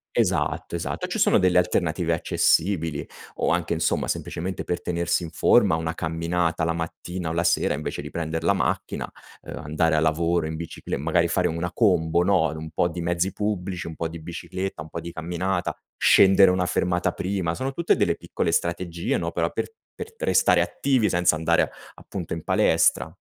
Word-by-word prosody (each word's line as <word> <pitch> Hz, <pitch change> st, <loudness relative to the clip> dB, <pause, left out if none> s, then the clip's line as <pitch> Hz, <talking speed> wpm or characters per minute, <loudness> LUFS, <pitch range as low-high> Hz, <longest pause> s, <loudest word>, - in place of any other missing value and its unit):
esatto, -, -, 0 dB
esatto. 85 Hz, -, -3 dB
Ci -, -, -3 dB
sono -, -, +4 dB
delle 90 Hz, -1 st, +3 dB
alternative 85 Hz, -1 st, 0 dB
accessibili 80 Hz, -2 st, +1 dB, 0.3 s
o -, -, +1 dB
anche, -, -, 0 dB
insomma, -, -, 0 dB
semplicemente 90 Hz, +2 st, -3 dB
per 90 Hz, -, -2 dB
tenersi 85 Hz, 0 st, -1 dB
in 80 Hz, -, -6 dB
forma 80 Hz, -, +4 dB
una 80 Hz, +1 st, -3 dB
camminata 85 Hz, 0 st, -1 dB
la 85 Hz, -, 0 dB
mattina 85 Hz, +1 st, -5 dB
o -, -, -3 dB
la 85 Hz, +1 st, 0 dB
sera -, -, +2 dB
invece 75 Hz, 0 st, -4 dB
di 75 Hz, -, -8 dB
prender 80 Hz, -1 st, -3 dB
la 100 Hz, -, +3 dB
macchina, 100 Hz, -, -2 dB, 0.3 s
uhm, -, -, -8 dB
andare 80 Hz, +2 st, 0 dB
a 75 Hz, -, +3 dB
lavoro 85 Hz, +1 st, +1 dB
in 80 Hz, -, -4 dB
biciclet 85 Hz, 0 st, -5 dB
magari -, -, +2 dB
fare -, -, +1 dB
una 85 Hz, +2 st, -3 dB
combo, 85 Hz, -6 st, +2 dB
no, 90 Hz, -3 st, +3 dB
un 80 Hz, 0 st, -7 dB
po' 85 Hz, -, +1 dB
di 85 Hz, 0 st, -5 dB
mezzi 85 Hz, +2 st, 0 dB
pubblici, 95 Hz, -4 st, -3 dB
un 80 Hz, -, -7 dB
po' 85 Hz, -, -2 dB
di 85 Hz, 0 st, -8 dB
bicicletta, 85 Hz, +1 st, -5 dB
un 80 Hz, -, -13 dB
po' 85 Hz, -, -4 dB
di 85 Hz, -, -7 dB
camminata, 90 Hz, +2 st, -2 dB, 0.2 s
scendere 95 Hz, -1 st, +6 dB
una 90 Hz, 0 st, +1 dB
fermata 90 Hz, 0 st, 0 dB
prima, 90 Hz, -3 st, -2 dB
sono 135 Hz, +1 st, -3 dB
tutte 170 Hz, +4 st, +2 dB
delle -, -, +1 dB
piccole -, -, -2 dB
strategie, 85 Hz, 0 st, -1 dB
no, 85 Hz, -1 st, -2 dB
però 85 Hz, 0 st, -1 dB
per -, -, -3 dB, 0.2 s
per 450 Hz, -, -8 dB
restare -, -, +3 dB
attivi 130 Hz, -6 st, +1 dB
senza 90 Hz, -2 st, +3 dB
andare 80 Hz, 0 st, +2 dB, 0.3 s
appunto 90 Hz, -4 st, -6 dB
in 80 Hz, -1 st, -5 dB
palestra. -, -, +2 dB
85 Hz, 185 wpm, -24 LUFS, 80-90 Hz, 0.3 s, scendere